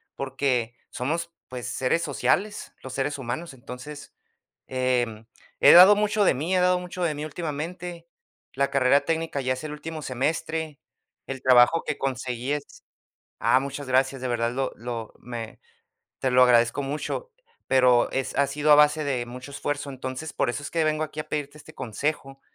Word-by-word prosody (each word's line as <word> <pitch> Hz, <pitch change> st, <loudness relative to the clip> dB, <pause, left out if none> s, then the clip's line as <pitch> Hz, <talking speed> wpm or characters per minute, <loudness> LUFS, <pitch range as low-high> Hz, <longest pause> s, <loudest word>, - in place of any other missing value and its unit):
porque 130 Hz, -3 st, -1 dB
somos, 170 Hz, +6 st, -3 dB, 0.2 s
pues 125 Hz, -3 st, -6 dB
seres 135 Hz, +6 st, 0 dB
sociales, 170 Hz, -, -1 dB
los 130 Hz, -1 st, -8 dB
seres 145 Hz, +2 st, -1 dB
humanos. 135 Hz, +5 st, -5 dB
Entonces, 130 Hz, +4 st, -10 dB, 0.5 s
em, 125 Hz, -4 st, -1 dB, 0.3 s
he -, -, +8 dB
dado 190 Hz, +4 st, +10 dB
mucho 210 Hz, 0 st, +2 dB
de -, -, +4 dB
mí, 160 Hz, +8 st, -1 dB
he 185 Hz, -, +3 dB
dado 180 Hz, 0 st, +3 dB
mucho 180 Hz, 0 st, -6 dB
de 160 Hz, -3 st, +1 dB
mí 150 Hz, +1 st, -5 dB
últimamente. 170 Hz, +3 st, -5 dB, 0.5 s
La 140 Hz, +1 st, +1 dB
carrera 140 Hz, 0 st, +4 dB
técnica 165 Hz, -3 st, -1 dB
ya 130 Hz, 0 st, 0 dB
es 130 Hz, -, -8 dB
el 155 Hz, -, -5 dB
último 155 Hz, +1 st, -7 dB
semestre. 155 Hz, +3 st, -2 dB, 0.5 s
El 135 Hz, -1 st, -5 dB
trabajo 130 Hz, +5 st, +5 dB
que 150 Hz, -, -3 dB
conseguí 130 Hz, 0 st, -2 dB
es 145 Hz, -1 st, -6 dB, 0.6 s
Ah, 130 Hz, -, +4 dB
muchas 140 Hz, 0 st, -6 dB
gracias, 130 Hz, 0 st, +1 dB
de 130 Hz, -, -2 dB
verdad, 120 Hz, -1 st, 0 dB
lo 135 Hz, +2 st, -2 dB
lo 115 Hz, -1 st, -6 dB
me 120 Hz, -2 st, -7 dB, 0.6 s
te 130 Hz, -, 0 dB
lo 125 Hz, 0 st, +6 dB
agradezco 120 Hz, +2 st, +4 dB
mucho, 150 Hz, -, -4 dB, 0.4 s
pero 125 Hz, -2 st, +4 dB
es 135 Hz, -1 st, -2 dB
Ha 140 Hz, -, +3 dB
sido 150 Hz, +2 st, +1 dB
a -, -, +10 dB
base 150 Hz, +1 st, +4 dB
de 130 Hz, -4 st, -1 dB
mucho 125 Hz, +3 st, -9 dB
esfuerzo. 145 Hz, 0 st, -3 dB
Entonces, 130 Hz, +3 st, -6 dB
por -, -, 0 dB
eso 135 Hz, +4 st, -4 dB
es -, -, -6 dB
que 165 Hz, -1 st, +1 dB
vengo 155 Hz, 0 st, +1 dB
aquí 155 Hz, 0 st, -6 dB
a 155 Hz, -, -5 dB
pedirte 150 Hz, -1 st, -4 dB
este 155 Hz, +1 st, -14 dB
consejo, 135 Hz, +3 st, -3 dB
140 Hz, 175 wpm, -25 LUFS, 125-155 Hz, 0.6 s, dado